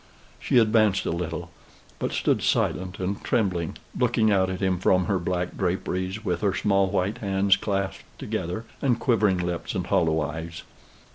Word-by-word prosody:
She - - +1
advanced 110 -3 +4
a - - 0
little, 85 0 -4 0.5
but - - -2
stood - - +1
silent 95 0 0
and 95 +2 -3
trembling, 90 -8 0 0.2
looking 115 -3 +2
out 95 -2 +3
at 95 0 -4
him 95 -2 +1
from 90 0 +3
her 100 -3 0
black 90 0 -2
draperies, 95 +3 -2
with - - -1
her 100 -3 +1
small 95 +1 +2
white 100 +2 -1
hands 100 -1 +3
clasped 100 -2 -2 0.2
together, 90 +7 -4 0.2
and 125 -4 +2
quivering 110 -7 +2
lips 90 -1 -3
and - - -1
hollow 80 -1 +2
eyes. 80 +3 -5
95 Hz, 160 wpm, -25 LUFS, 90-105 Hz, 0.5 s, advanced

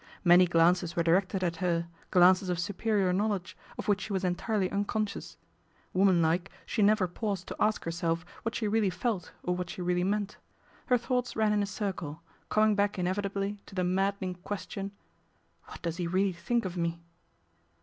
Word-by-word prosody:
Many 180 0 +7
jlances 170 +1 +3
were 170 - +2
directed 185 +3 +2
at 170 -2 -1
her, 170 -1 0 0.2
glances 185 +1 +5
of 180 - 0
superior 195 +1 0
lowledge, 200 -2 -1 0.2
of - - -5
which 205 -1 +2
she 210 - -5
was 190 0 -1
entirely 190 +2 0
unconscious. 205 +1 -2 0.6
Woman 185 -2 +4
like 175 +4 +1 0.2
she 220 - -1
never 205 -2 +4
paused 195 0 -3
to - - -5
ask 215 0 +2
herself 165 0 -1 0.2
what 225 - -2
ic 210 - 0
really 220 -3 +3
felt 190 -1 -2
or 180 - 0
what 180 -1 -4
she 180 - -5
really 180 0 +1
meant. 205 +1 -1 0.5
Her 250 - +4
:houghts 250 +1 -1
ran 215 -1 +2
in 210 - +2
a 200 - -1
circle, 190 -7 -4 0.3
coming 215 0 +4
back 205 0 +1
inevitably 195 +2 -1
:o - - -17
the 185 - +1
maddening 190 +1 0
question, 195 +2 -5 0.4
" - - -39
What - - -11
does 170 -1 -2
he 175 -2 -1
really 190 +2 +1
:hink 230 +7 -1
of 185 -1 -4
me 170 -1 -2
190 Hz, 180 wpm, -30 LUFS, 175-205 Hz, 0.6 s, Many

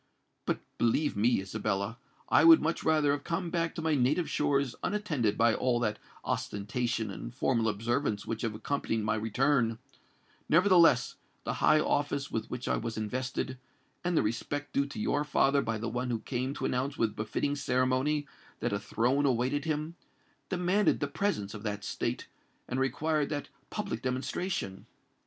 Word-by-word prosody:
But, - - 0 0.2
believe 145 +6 +2
me, 110 +1 +3
Isabella—I 100 +7 -1
would 165 0 +9
much 165 +2 -1
rather 155 -2 +3
have 145 0 -1
come 170 0 -2
back 165 -1 -1
to 165 - -4
my 160 -1 +2
native 145 +5 +2
shores 140 -4 +1
unattended 150 - 0
by 115 0 +4
all 120 +1 +1
that 105 -2 -1 0.3
ostentation 110 +1 -2
and 115 - -7
formal 115 -4 +2
observance 110 0 -1
which 115 -1 -3
have 115 -3 -2
accompanied 115 -2 -1
my 105 0 +1
return: 115 +2 +1 0.7
nevertheless, 170 -7 +5 0.3
the - - -2
high 155 - +6
office 145 -2 0
with 110 -1 -3
which 125 0 -5
I - - +2
was 115 -1 -4
invested, 130 +4 -3 0.4
and 175 -2 +1
the - - +4
respect 145 +7 -3
due 140 0 +2
to 140 - -7
your 150 -9 +1
father 140 -1 +3
by 115 -2 -2
the 115 +2 -3
one 125 +2 -2
who 115 -2 -1
came 130 +2 -2
to - - -3
announce 130 +3 -1
with 110 -2 0
befitting 140 +6 -1
ceremony 130 +3 +1 0.3
that - - -1
a 100 - 0
throne 125 +7 +1
awaited 130 +3 +1
him, 155 +1 -2 0.6
demanded 185 +3 +2
the - - 0
presence 105 - -1
of 105 - -7
that 105 -1 -3
state - - -2 0.4
and 125 - -2
required 150 +3 0
that 145 -1 -3 0.2
public 115 - -3
demonstration. 130 - -3
130 Hz, 165 wpm, -30 LUFS, 115-150 Hz, 0.7 s, would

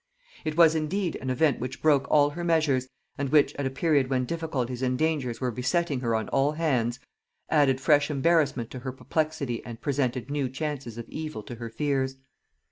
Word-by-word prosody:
It 155 0 -3
was 165 -2 +7
indeed 165 +3 -1
an 130 - -5
event 135 +2 +2
which 125 +1 -5
broke 145 -3 +3
all 145 -1 +4
her 175 +3 -5
measures, 155 -6 +2 0.3
and 140 -2 -1
which, 150 0 +4
at 140 -1 -1
a - - -1
period 140 -1 +1
when 130 -1 +1
difficulties 130 -6 -3
and 130 -1 0
dangers 145 -7 0
were 125 -2 -1
besetting 135 +5 0
her 115 -3 0
on 110 -1 -1
all 140 +2 +2
hands, 130 -7 0 0.5
added 140 -4 +4
fresh 145 +1 +3
embarrassment 145 -5 +1
to 130 - -6
her 130 +1 -5
perplexity 140 -3 -2
and 115 -1 -8
presented 130 -2 -1
new 145 -3 -1
chances 135 -4 -4
of 115 -1 -7
evil 155 -8 -6
to 120 - -8
her 115 0 -6
fears. 135 +1 -1
140 Hz, 190 wpm, -27 LUFS, 125-155 Hz, 0.5 s, was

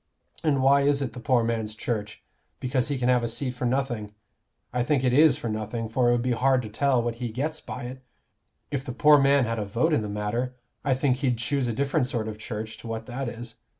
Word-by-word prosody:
And 140 -4 +2
why 140 +1 +5
is 140 0 +2
it 125 - -4
the 125 - -7
poor 125 -1 +2
man's 110 -2 -2
Church? 105 -2 -4 0.4
Because 130 -1 0
he 145 -1 -1
can 125 -1 0
have 125 -1 +4
a - - 0
seat 125 +3 -2
for 125 0 -4
nothing. 120 -5 -2 0.6
I 125 - +1
think 135 0 +1
it 125 -1 +2
is 150 -1 +6
for - - -5
nothing; 110 +1 -3
for 120 +1 +2
it - - +5
would 120 -1 +1
be 125 - 0
hard 130 +2 +2
to 110 - -6
tell 130 +2 +2
what 115 -1 -2
he 120 - -1
gets 145 +7 -3
by - - -7
it. 130 +2 -7 0.7
If 135 -2 -2
the 125 - -5
poor 150 +3 +6
man 140 -1 +4
had 115 -1 -2
a - - -1
vote 120 +11 +1
in 130 - +3
the 105 - -4
matter, 105 +5 -2 0.3
I 135 -2 +2
think 130 -1 +1
he'd 130 -3 0
choose 130 +3 0
a - - 0
different 140 +2 +1
sort 115 -4 -2
of 110 -1 -6
Church 110 0 -5
to - - -10
what 115 0 -4
that 130 0 -4
is. 115 0 -9
125 Hz, 250 wpm, -26 LUFS, 115-135 Hz, 0.7 s, is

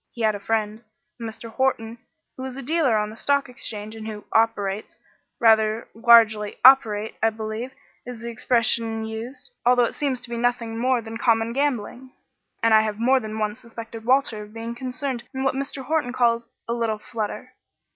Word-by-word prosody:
He 235 - -7
had 215 -1 +3
a 205 - -5
friend 215 +1 -2 0.4
a - - -7
Mr. 225 +1 -6
Horton 230 -2 -1 0.4
who 260 - -7
is 260 -1 -6
a 275 - -6
dealer 285 -5 +2
on 210 0 -1
the - - -10
Stock 280 +4 +1
Exchange 215 -3 -6
and 220 0 -7
who 210 -1 -7
'operates' 215 -3 0 0.4
rather 220 0 +3
largely 225 -2 +5
'operate' 220 -5 +6
I 225 - +4
believe 220 +3 -5 0.3
is 245 -2 -8
the 235 0 -5
expression 230 -1 +1
used, 230 - -7
although 245 0 +5
it - - -4
seems 275 -4 -1
to - - -6
be 235 - -2
nothing 235 -1 -1
more 250 -1 +1
than 225 0 -6
common 230 -1 +2
gambling 260 -2 -2 0.5
and 230 -1 +4
I 220 - +7
have 215 -1 -2
more 255 +4 +3
than 215 -2 -6
once 215 0 -2
suspected 230 -1 -9
Walter 250 -3 +2
of 210 +1 -12
being 230 +1 -5
concerned 255 0 -4
in 265 - -2
what 270 - +2
Mr. 275 0 -4
Horton 295 -3 -1
calls 235 -2 +1 0.2
'a 235 - -1
little 230 -2 -1
flutter.'" 220 +3 -5
230 Hz, 185 wpm, -24 LUFS, 220-250 Hz, 0.5 s, I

